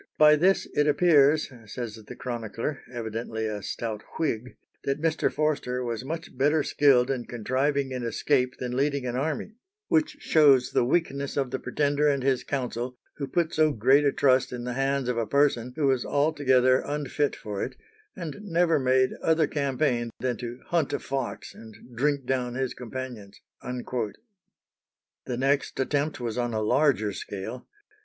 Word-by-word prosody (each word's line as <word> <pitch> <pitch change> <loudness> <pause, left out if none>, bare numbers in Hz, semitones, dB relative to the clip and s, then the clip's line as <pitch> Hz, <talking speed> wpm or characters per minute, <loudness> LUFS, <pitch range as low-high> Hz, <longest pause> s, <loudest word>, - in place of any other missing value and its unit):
"By 150 0 +7
this 185 +5 +2
it 150 - +2
appears," 150 -1 +4 0.2
says 115 0 -5
the 110 -1 -10
chronicler, 120 +3 -4
evidently 110 -1 -4
a 105 -1 -3
stout 110 0 -4 0.2
Whig, 125 -6 -2 0.3
"that 140 +1 -1
Mr. 160 0 +1
Forster 140 -5 -1
was 120 -1 -3
much 160 +4 -6
better 145 +4 +2
skilled 135 -3 +4
in 125 -3 -3
contriving 130 +4 -1
an 125 - -3
escape 125 +2 0
than 125 -1 -4
leading 140 0 0
an 120 -1 -2
army, 155 +9 -2 0.4
which 315 -3 +2
shows 140 - +4
the - - +3
weakness 140 0 0
of 135 -3 0
the 130 - -2
Pretender 145 0 +1
and 140 -3 +1
his 135 -2 +1
council, 125 -2 -3 0.2
who 140 - -3
put 170 +2 0
so 155 -1 +3
great 130 +6 +4
a 140 - +3
trust 130 -2 +3
in 125 -1 -5
the 125 0 -3
hands 135 0 0
of 125 -1 0
a 115 - -1
person 130 -2 +2
who 155 -2 0
was 130 -3 +2
altogether 130 -3 +3
unfit 145 0 -1
for 105 -2 -5
it, - - -5 0.4
and 170 0 -6
never 170 -5 +2
made 130 0 +3
other 160 -1 +3
campaign 135 -4 0
than 125 -1 -1
to 120 +1 -7
hunt 170 -4 +1
a - - 0
fox 135 -2 -4
and 110 -1 -13 0.2
drink 140 +2 0
down 125 -2 -1
his 130 -1 -1
companions." 120 -5 -7 0.2
The 125 - -8
next 135 +2 0
attempt 145 +3 0
was 120 0 -3
on 120 -2 -1
a 110 - 0
larger 110 -4 +2
scale. 100 +6 -6
130 Hz, 165 wpm, -27 LUFS, 120-145 Hz, 0.4 s, By